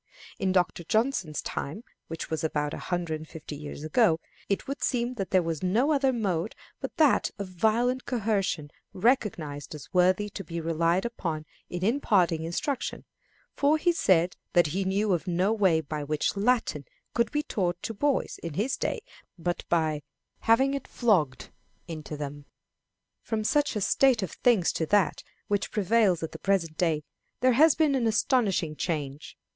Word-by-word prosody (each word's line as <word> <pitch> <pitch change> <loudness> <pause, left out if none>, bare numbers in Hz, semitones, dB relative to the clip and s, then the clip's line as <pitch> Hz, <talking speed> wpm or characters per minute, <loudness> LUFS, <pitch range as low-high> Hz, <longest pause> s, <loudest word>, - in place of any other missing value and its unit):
In 190 -1 +1
Dr. 180 -2 +1
Johnson's 215 - 0
time, 165 +11 -4 0.2
which 165 0 -6
was 160 -1 -2
about 150 -2 -1
a - - -5
hundred 170 -3 -2
and 155 - -10
fifty 155 -1 -8
years 145 0 -8
ago, 165 -1 +3 0.3
it 200 +7 -1
would 275 +1 -4
seem 245 -1 0
that 195 -7 -4
there 185 -2 +3
was 165 -2 -3
no 225 +11 +2
other 275 -3 +3
mode 205 -5 -1 0.2
but - - -6
that 305 -5 +4
of 200 -2 -4
violent 230 +7 +1
coercion 195 - -1 0.2
recognized 180 - 0
as 150 +1 -11
worthy 185 +3 +3
to 195 - -6
be 170 -2 -5
relied 165 +3 +1
upon 165 -10 -3 0.2
in 180 +1 -3
imparting 195 - +2
instruction, 260 - -3 0.5
for 290 +2 +3
he 345 +3 +3
said 180 - +2 0.2
that 175 - +5
he 185 +6 -1
knew 195 +1 +1
of 175 +2 -2
no 180 +4 +2
way 190 -7 +3
by 150 0 -4
which 150 +5 -1
Latin 235 +4 +1 0.3
could 235 -2 +2
be 295 0 0
taught 180 -9 -1
to 225 - -3
boys 280 +6 0
in 165 -3 -5
his 225 +9 0
day - - -2 0.4
but 175 +1 -2
"by 155 -3 +1 0.4
having 265 +5 +3
it 275 -1 -4
flogged 170 - +1 0.4
into 155 -2 -6
them." 145 0 -6 0.8
From 220 -1 -2
such 290 +3 +1
a 210 - -1
state 250 +1 +3
of 185 - -4
things 225 -8 +3
to 160 - -1
that 205 -2 +2 0.3
which 205 -1 0
prevails 210 -4 +2
at 160 - -3
the - - -9
present 180 -5 0
day 160 -3 +1 0.4
there 255 0 +5
has 310 +5 +6
been 305 -3 +3
an 250 -4 +1
astonishing 210 - +1
change. 145 -4 -4
190 Hz, 170 wpm, -28 LUFS, 160-235 Hz, 0.8 s, has